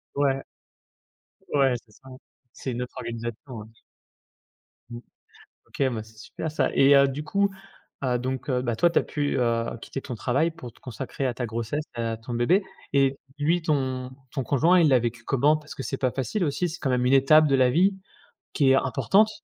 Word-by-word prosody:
Ouais, 135 Hz, -1 st, +1 dB, 1.1 s
ouais, 135 Hz, -3 st, +4 dB
c'est 105 Hz, -, -25 dB
ça. 135 Hz, +5 st, -17 dB, 0.4 s
C'est 130 Hz, -, -5 dB
une 120 Hz, +1 st, -4 dB
autre 125 Hz, -, -10 dB
organisation, 120 Hz, +2 st, -6 dB
ouais. 105 Hz, -, -9 dB, 1.2 s
Mmh. 120 Hz, 0 st, -7 dB, 0.7 s
OK, -, -, -4 dB
bah, 110 Hz, -2 st, -3 dB
c'est 110 Hz, 0 st, -17 dB
super 155 Hz, +7 st, -6 dB
ça, 145 Hz, -3 st, 0 dB
et 140 Hz, +1 st, +6 dB
heu, 140 Hz, 0 st, +6 dB
du 140 Hz, +3 st, -4 dB
coup, 200 Hz, +2 st, +1 dB, 0.5 s
heu, 125 Hz, -1 st, +1 dB
donc 130 Hz, +2 st, -4 dB
heu, 125 Hz, -1 st, +1 dB
bah, 120 Hz, -3 st, -1 dB
toi 175 Hz, +8 st, +4 dB
tu -, -, +3 dB
as -, -, -2 dB
pu, 145 Hz, -2 st, -2 dB
heu, 115 Hz, -2 st, +1 dB, 0.2 s
quitter 135 Hz, -, -6 dB
ton 125 Hz, -, -6 dB
travail 140 Hz, +9 st, +1 dB
pour 150 Hz, -8 st, -10 dB
te -, -, -24 dB
consacrer 130 Hz, +2 st, -5 dB
à 125 Hz, -, -1 dB
ta 125 Hz, -, -3 dB
grossesse, 115 Hz, +6 st, -3 dB
heu, 115 Hz, -, -1 dB
à 115 Hz, -1 st, -2 dB
ton 115 Hz, +2 st, -7 dB
bébé, 175 Hz, -, +2 dB, 0.3 s
et 135 Hz, -1 st, +3 dB, 0.2 s
lui 165 Hz, +4 st, +1 dB
ton 130 Hz, -4 st, -1 dB, 0.2 s
ton 135 Hz, -3 st, -2 dB
conjoint 160 Hz, +9 st, +4 dB
il 160 Hz, -, +5 dB
l'a 130 Hz, -2 st, +5 dB
vécu 120 Hz, 0 st, -3 dB
comment? 145 Hz, +5 st, +3 dB
Parce 150 Hz, 0 st, -11 dB
que 135 Hz, -, -5 dB
c'est 130 Hz, +4 st, -3 dB
pas 130 Hz, -2 st, 0 dB
facile 175 Hz, +9 st, -2 dB
aussi, 150 Hz, +5 st, -1 dB
c'est 165 Hz, -, -8 dB
quand 135 Hz, -, -1 dB
même 125 Hz, -1 st, +1 dB
une 130 Hz, -, +3 dB
étape 150 Hz, +3 st, +6 dB
de 135 Hz, -, +3 dB
la 130 Hz, -1 st, +4 dB
vie 185 Hz, +8 st, +3 dB, 0.6 s
qui 140 Hz, -3 st, +3 dB
est -, -, +6 dB
importante, 135 Hz, -, +3 dB
135 Hz, 205 wpm, -25 LUFS, 120-150 Hz, 1.2 s, et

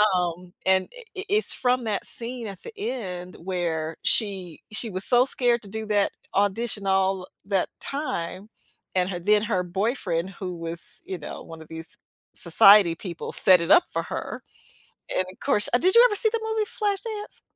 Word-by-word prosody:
Um, 180 Hz, 0 st, -2 dB
and, 190 Hz, 0 st, +3 dB
i -, -, -9 dB, 0.2 s
i -, -, -2 dB
it's 420 Hz, +2 st, +2 dB
from 250 Hz, 0 st, +1 dB
that 210 Hz, -4 st, -2 dB
scene 235 Hz, 0 st, -3 dB
at 195 Hz, -3 st, -8 dB
the -, -, -8 dB
end 185 Hz, -, -4 dB
where 165 Hz, -3 st, -3 dB
she 190 Hz, -7 st, 0 dB
she 220 Hz, +2 st, +2 dB
was 185 Hz, -1 st, -3 dB
so 245 Hz, 0 st, +5 dB
scared 245 Hz, -3 st, +1 dB
to 200 Hz, -, -9 dB
do 220 Hz, +2 st, -4 dB
that 205 Hz, -1 st, +2 dB, 0.2 s
audition 205 Hz, +1 st, 0 dB
all 190 Hz, -1 st, +1 dB, 0.2 s
that 195 Hz, -2 st, 0 dB
time, 200 Hz, -, -4 dB, 0.5 s
and 180 Hz, 0 st, +2 dB
her 180 Hz, -2 st, -3 dB
then 210 Hz, +4 st, +3 dB
her 185 Hz, -4 st, 0 dB
boyfriend 185 Hz, -2 st, -1 dB
who 180 Hz, -1 st, -6 dB
was, 165 Hz, -1 st, -6 dB
you 190 Hz, -, -4 dB
know, 150 Hz, -, -8 dB
one 165 Hz, -1 st, -11 dB
of 160 Hz, -, -12 dB
these 160 Hz, 0 st, -8 dB, 0.4 s
society 180 Hz, +1 st, +6 dB
people 170 Hz, -1 st, -6 dB
set 185 Hz, -1 st, +6 dB
it 170 Hz, -, -3 dB
up 345 Hz, +2 st, +8 dB
for -, -, -1 dB
her. -, -, -5 dB, 0.7 s
And -, -, +3 dB
of 185 Hz, -, -20 dB
course, 210 Hz, -7 st, +1 dB
uh -, -, +6 dB
did 370 Hz, +8 st, +2 dB
you 470 Hz, -, +9 dB
ever 420 Hz, -, +2 dB
see 440 Hz, +2 st, +3 dB
the 460 Hz, -, 0 dB
movie 440 Hz, -1 st, 0 dB
"Flashdance?" 420 Hz, -2 st, -3 dB
195 Hz, 185 wpm, -25 LUFS, 180-245 Hz, 0.7 s, you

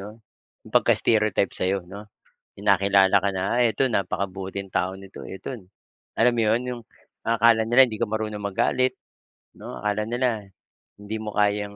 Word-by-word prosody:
'no, 100 Hz, -, -8 dB, 0.7 s
pagka-stereotype 105 Hz, -4 st, +2 dB
sa'yo 95 Hz, +1 st, +1 dB
'no. 100 Hz, +3 st, -9 dB, 0.6 s
Yung -, -, -8 dB
nakilala 100 Hz, 0 st, +5 dB
ka 100 Hz, -, +2 dB
na, 95 Hz, -, -1 dB, 0.2 s
ah, -, -, +4 dB
"Ito 110 Hz, -, 0 dB
napakabuting 95 Hz, 0 st, -3 dB
tao 90 Hz, -, 0 dB
nito 95 Hz, 0 st, -12 dB, 0.2 s
eto" 95 Hz, -, -8 dB, 0.7 s
alam 120 Hz, +2 st, +5 dB
mo -, -, +2 dB
'yon, 110 Hz, +3 st, +2 dB
yung 120 Hz, -1 st, -5 dB, 0.5 s
ang 115 Hz, -, +3 dB
akala 115 Hz, 0 st, +5 dB
nila 120 Hz, +3 st, +6 dB
hindi 110 Hz, -3 st, -7 dB
ka 115 Hz, -, +1 dB
marunong 110 Hz, -1 st, -3 dB
magalit 130 Hz, +6 st, +1 dB, 0.6 s
'no. -, -, -10 dB
Akala 105 Hz, 0 st, -1 dB
nila 125 Hz, +1 st, +1 dB, 0.7 s
hindi 105 Hz, +2 st, -6 dB
mo 105 Hz, -, -4 dB
kayang 105 Hz, 0 st, +1 dB
105 Hz, 160 wpm, -24 LUFS, 100-110 Hz, 0.7 s, nila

